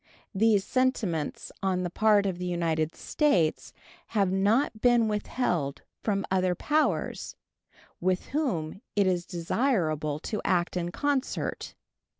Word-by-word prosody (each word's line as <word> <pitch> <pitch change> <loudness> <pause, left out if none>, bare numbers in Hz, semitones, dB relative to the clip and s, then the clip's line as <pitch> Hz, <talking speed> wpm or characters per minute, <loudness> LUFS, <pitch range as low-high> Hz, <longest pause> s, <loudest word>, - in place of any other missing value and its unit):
These 210 -1 +3
sentiments 220 - -1
on 185 -1 0
the 175 - -3
part 210 0 +4
of 185 -3 -2
the 180 - -3
United 165 -2 0
States 185 - +1 0.4
have 200 -4 +1
not 215 +4 +2
been 240 -2 +4
withheld 190 - -1 0.2
from 200 -2 0
other 185 -1 +2
powers, 305 - 0 0.6
with 185 +1 0
whom 210 - -2
it 200 -1 +3
is 180 -2 0
desirable 165 - 0
to 215 - -3
act 175 -1 +1
in 175 -1 -1
concert. 285 +4 -2
190 Hz, 125 wpm, -28 LUFS, 175-225 Hz, 0.6 s, part